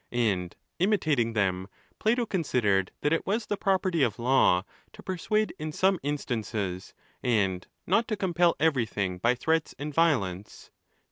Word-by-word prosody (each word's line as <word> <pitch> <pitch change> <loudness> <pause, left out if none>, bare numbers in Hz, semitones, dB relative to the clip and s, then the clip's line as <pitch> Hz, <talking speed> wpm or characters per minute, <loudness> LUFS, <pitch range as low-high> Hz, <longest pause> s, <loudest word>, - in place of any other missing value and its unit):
And 100 -7 0 0.2
imitating 155 - +1
them, 95 -3 0 0.3
Plato 235 +2 +2
considered 115 - +1
that 145 - +1
it 165 - -1
was 215 +3 0
the 205 - -1
pro 195 -1 +2
perty 185 -4 -1
of 115 -7 +1
law, 120 -7 +3 0.3
to - - -13
persuade 215 +4 -1
in 155 0 -4
some 190 +3 +2
instances, 110 -9 -3 0.3
and 100 -7 0 0.2
not 220 +6 +2
to 215 - -2
compel 175 -3 +2
everything 110 - 0
by 120 +5 +2
threats 160 +5 0
and 150 +1 -5
violence. 105 - 0
140 Hz, 145 wpm, -27 LUFS, -, 0.3 s, law